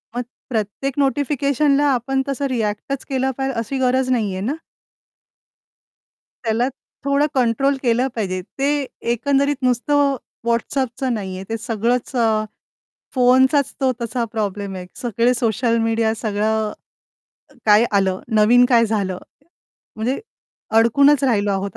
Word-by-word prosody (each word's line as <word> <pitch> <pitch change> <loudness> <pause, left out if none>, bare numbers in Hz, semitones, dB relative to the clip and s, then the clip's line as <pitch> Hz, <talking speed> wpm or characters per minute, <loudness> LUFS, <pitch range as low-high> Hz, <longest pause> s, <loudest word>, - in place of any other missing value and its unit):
मग 245 - 0 0.3
प्रत्येक 225 +4 -2
नोटिफिकेशनला 280 +1 +2
आपण 265 +2 0
तसं 275 0 -2
रिएक्टच 230 +3 -2
केलं 265 0 0
पाहिजे 270 0 -1
अशी 230 +4 -3
गरज 255 0 +1
नाही 220 -6 +1
आहे 190 - -4
ना? 275 - 0 1.9
त्याला 230 +2 +1 0.4
थोडं 280 +1 +3
कंट्रोल 260 +3 +2
केलं 245 +2 +2
पाहिजे, 185 -4 -2 0.2
ते 285 0 +1 0.3
एकंदरीत 280 +4 +1
नुसतं 275 +3 +2 0.3
WhatsAppचं 250 +2 -1
नाहीये 190 -3 -5
ते 225 - -1
सगळंच 235 +3 -1
अ, 235 - +3 0.9
फोनचाच 260 +2 +4
तो 265 -1 +3
तसा 235 +1 -2
प्रॉब्लेम 205 -2 -3
आहे. 180 -1 -7 0.2
सगळे 240 +1 +1
सोशल 230 0 +1
मीडिया 225 -1 +1
सगळं 215 0 0 0.9
काय 210 +2 +6
आलं, 190 -1 0 0.2
नवीन 240 +4 +6
काय 230 -2 +4
झालं? 195 -4 -1 0.8
म्हणजे 240 +5 -1 0.6
अडकूनच 280 +5 +5
राहिलो 210 -5 +2
आहोत 195 0 -3
240 Hz, 120 wpm, -20 LUFS, 220-270 Hz, 1.9 s, काय